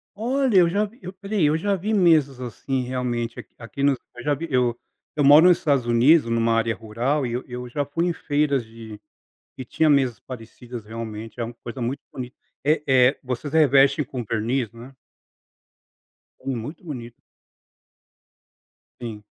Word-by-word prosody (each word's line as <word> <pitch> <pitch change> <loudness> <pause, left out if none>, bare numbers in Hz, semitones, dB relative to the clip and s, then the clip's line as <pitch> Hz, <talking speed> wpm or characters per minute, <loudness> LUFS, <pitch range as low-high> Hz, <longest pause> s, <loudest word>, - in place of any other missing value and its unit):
Olha, 250 0 +1
eu 175 -2 +6
já 205 +4 +1
vi 225 +5 -15
eu 185 +1 -8
olha 205 +1 -3
aí, 160 - +4
eu 150 +2 +3
já 200 +3 0
vi 210 +4 -2
mesas, 155 -9 +3
assim, 130 +2 -3
realmente 120 -2 -3
aqui - - -12
aqui 120 +3 -8
nos 140 -2 +3 0.2
eu 120 - -9
já 145 0 +1
vi 165 +4 -4
eu 125 -2 +1 0.4
eu 145 - +1
moro 145 +5 +8
nos 180 -2 +6
Estados 140 -5 +1
Unidos 120 +4 +4
numa 115 0 +2
área 115 0 +1
rural 120 +6 -1
e 120 - -3
eu 125 +2 -3
eu 125 -1 -7
já 145 +3 -2
fui 165 +5 -1
em 175 - 0
feiras 145 -5 0
de 110 -2 -11 0.6
que 130 - -6
tinha 155 +5 +1
mesas 130 -5 +2
parecidas, 120 -1 -9
realmente 110 0 -7
é - - 0
uma 120 - -8
coisa 125 +1 -6
muito 130 +4 -3
bonita, 125 0 -7 0.3
eh 150 0 +2
eh, 130 0 +4
vocês 130 +3 -4
revestem 140 -1 +4
com 130 -3 -6
verniz, 115 +2 -1
né? 120 +4 -12 1.5
Com 135 -2 -3
muito 145 +10 -7
bonito. 120 -7 -8 1.8
Sim. 110 -3 -7
130 Hz, 175 wpm, -23 LUFS, 120-150 Hz, 1.8 s, moro